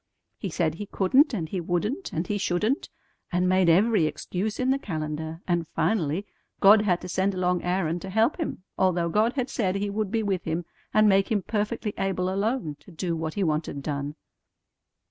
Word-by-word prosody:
He 195 Hz, -, -3 dB
said 160 Hz, -1 st, 0 dB
he 205 Hz, +5 st, -7 dB
couldn't 260 Hz, -, +3 dB
and 180 Hz, -10 st, -2 dB
he 180 Hz, +2 st, -3 dB
wouldn't 210 Hz, -, -2 dB
and 165 Hz, +3 st, -2 dB
he 205 Hz, +2 st, -2 dB
shouldn't, 205 Hz, +8 st, 0 dB, 0.4 s
and 180 Hz, +1 st, +2 dB
made 185 Hz, -1 st, +4 dB
every 195 Hz, 0 st, +4 dB
excuse 195 Hz, +6 st, -3 dB
in 255 Hz, +1 st, +2 dB
the 275 Hz, -, +1 dB
calendar; 160 Hz, -, -4 dB
and 170 Hz, -2 st, 0 dB
finally 180 Hz, -2 st, 0 dB, 0.3 s
God 205 Hz, +2 st, +7 dB
had 180 Hz, -4 st, +1 dB
to 180 Hz, -, -6 dB
send 190 Hz, +2 st, 0 dB
along 180 Hz, -1 st, +1 dB
Aaron 175 Hz, -2 st, 0 dB
to 190 Hz, -, -7 dB
help 220 Hz, +7 st, +2 dB
him, 310 Hz, -, -3 dB, 0.2 s
although 180 Hz, -3 st, +2 dB
God 215 Hz, +6 st, +2 dB
had 255 Hz, -3 st, -1 dB
said 190 Hz, -8 st, -1 dB
He 200 Hz, 0 st, -1 dB
would 210 Hz, -1 st, -1 dB
be 225 Hz, +1 st, 0 dB
with 195 Hz, -4 st, -1 dB
him 165 Hz, +1 st, -2 dB, 0.3 s
and 215 Hz, 0 st, +5 dB
make 195 Hz, +1 st, +3 dB
him 205 Hz, -3 st, +1 dB
perfectly 210 Hz, 0 st, -2 dB
able 190 Hz, -1 st, 0 dB
alone 200 Hz, -, -1 dB
to 150 Hz, -, -17 dB
do 170 Hz, 0 st, -3 dB
what 160 Hz, -1 st, -4 dB
He 200 Hz, -, 0 dB
wanted 155 Hz, -3 st, -1 dB
done." 145 Hz, 0 st, -3 dB
185 Hz, 195 wpm, -26 LUFS, 170-210 Hz, 0.4 s, God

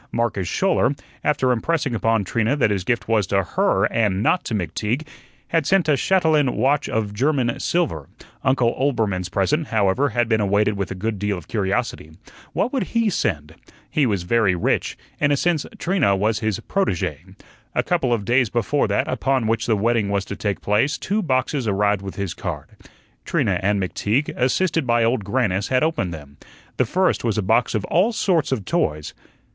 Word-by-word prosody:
Marcus 110 Hz, -6 st, -1 dB
Schouler 160 Hz, -, +1 dB, 0.3 s
after 130 Hz, -4 st, +2 dB
impressing 135 Hz, +2 st, 0 dB
upon 115 Hz, -1 st, +1 dB
Trina 115 Hz, +6 st, 0 dB
that 125 Hz, -7 st, +2 dB
his 95 Hz, -3 st, -1 dB
gift 120 Hz, +3 st, -1 dB
was 110 Hz, -4 st, +2 dB
to 95 Hz, +1 st, +1 dB
HER, 195 Hz, -, +1 dB
and 105 Hz, -3 st, +1 dB
not 180 Hz, -, +2 dB
to 115 Hz, -, -2 dB
McTeague 105 Hz, -, -2 dB, 0.4 s
had 165 Hz, -3 st, +1 dB
sent 190 Hz, -4 st, +3 dB
a 150 Hz, -, +4 dB
chatelaine 155 Hz, -4 st, +2 dB
watch 140 Hz, +2 st, +1 dB
of 105 Hz, -2 st, -2 dB
German 130 Hz, 0 st, 0 dB
silver; 145 Hz, -, -1 dB, 0.3 s
Uncle 130 Hz, -3 st, +2 dB
Oelbermann's 110 Hz, -10 st, 0 dB
present, 140 Hz, -, 0 dB
however, 110 Hz, +6 st, +1 dB
had 120 Hz, 0 st, 0 dB
been 110 Hz, -2 st, +2 dB
awaited 105 Hz, +1 st, +2 dB
with 100 Hz, -2 st, -3 dB
a -, -, -5 dB
good 105 Hz, +2 st, -3 dB
deal 105 Hz, -1 st, -1 dB
of 85 Hz, -, -11 dB
curiosity. 95 Hz, -6 st, -2 dB, 0.4 s
What 250 Hz, -, -1 dB
would 255 Hz, -3 st, -2 dB
he 225 Hz, -3 st, +2 dB
send? 75 Hz, -, -2 dB, 0.4 s
He 145 Hz, -4 st, +2 dB
was 100 Hz, -5 st, -1 dB
very 100 Hz, 0 st, +2 dB
rich; 85 Hz, -, -1 dB, 0.2 s
in 145 Hz, -, +2 dB
a 145 Hz, -, +3 dB
sense 165 Hz, -1 st, 0 dB
Trina 175 Hz, -, +1 dB
was 105 Hz, +2 st, 0 dB
his 110 Hz, -3 st, -1 dB
protege. 195 Hz, -, -1 dB, 0.5 s
A -, -, +2 dB
couple 165 Hz, -8 st, 0 dB
of 110 Hz, -4 st, 0 dB
days 120 Hz, +1 st, +2 dB
before 120 Hz, +6 st, 0 dB
that -, -, 0 dB
upon 135 Hz, -3 st, 0 dB
which 115 Hz, +1 st, 0 dB
the 110 Hz, -3 st, +2 dB
wedding 110 Hz, -1 st, +1 dB
was 100 Hz, -1 st, -1 dB
to 100 Hz, -, -6 dB
take 100 Hz, -1 st, -3 dB
place, 115 Hz, +8 st, +1 dB
two 210 Hz, +3 st, -1 dB
boxes 130 Hz, -, 0 dB
arrived 100 Hz, 0 st, +1 dB
with 95 Hz, -1 st, -7 dB
his 100 Hz, -4 st, -3 dB
card. -, -, -6 dB, 0.5 s
Trina -, -, 0 dB
and 100 Hz, +1 st, +1 dB
McTeague, 105 Hz, +8 st, -1 dB
assisted 155 Hz, +3 st, +1 dB
by 120 Hz, -1 st, +3 dB
Old 115 Hz, -1 st, +1 dB
Grannis, 100 Hz, -2 st, 0 dB
had 130 Hz, +1 st, +2 dB
opened 155 Hz, -, 0 dB
them. 70 Hz, -3 st, -10 dB, 0.4 s
The 130 Hz, -, +2 dB
first 185 Hz, +10 st, +1 dB
was 115 Hz, -2 st, 0 dB
a 105 Hz, -, 0 dB
box 115 Hz, +5 st, +2 dB
of 110 Hz, -, -1 dB
all 195 Hz, +7 st, +2 dB
sorts 175 Hz, -9 st, +1 dB
of 110 Hz, -8 st, -2 dB
toys. 75 Hz, -3 st, -1 dB
115 Hz, 185 wpm, -22 LUFS, 100-145 Hz, 0.5 s, a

